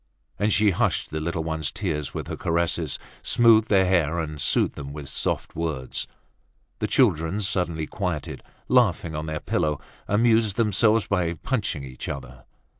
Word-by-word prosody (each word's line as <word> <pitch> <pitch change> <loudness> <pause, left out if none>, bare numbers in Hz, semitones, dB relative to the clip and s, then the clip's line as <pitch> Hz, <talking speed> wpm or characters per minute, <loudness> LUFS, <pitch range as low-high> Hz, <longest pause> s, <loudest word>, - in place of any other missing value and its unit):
And 105 +2 +2
she 105 0 +4
hushed 85 - 0
the 80 - -2
little 85 0 -2
ones' 80 -3 -2
tears 75 -8 -3
with - - -5
her - - -4
caresses, 85 -2 0 0.2
smoothed 115 -2 +4
their 95 -2 +5
hair, 85 -3 +2
and 75 -3 -4
soothed - - +2
them 70 -1 -7
with 75 -2 -7
soft - - -2
words. 75 -6 -3 0.7
The - - 0
children, 80 +6 +2
suddenly 90 -5 -1
quieted, 90 -5 -4 0.3
laughing 95 -10 +2
on 75 +1 -4
their 80 0 -3
pillow, 75 -1 0 0.3
amused 110 -1 +3
themselves 110 0 +3
by 90 -4 0
punching 100 - -2
each 65 -2 -7
other. 60 -2 -7
85 Hz, 155 wpm, -25 LUFS, 75-105 Hz, 0.7 s, their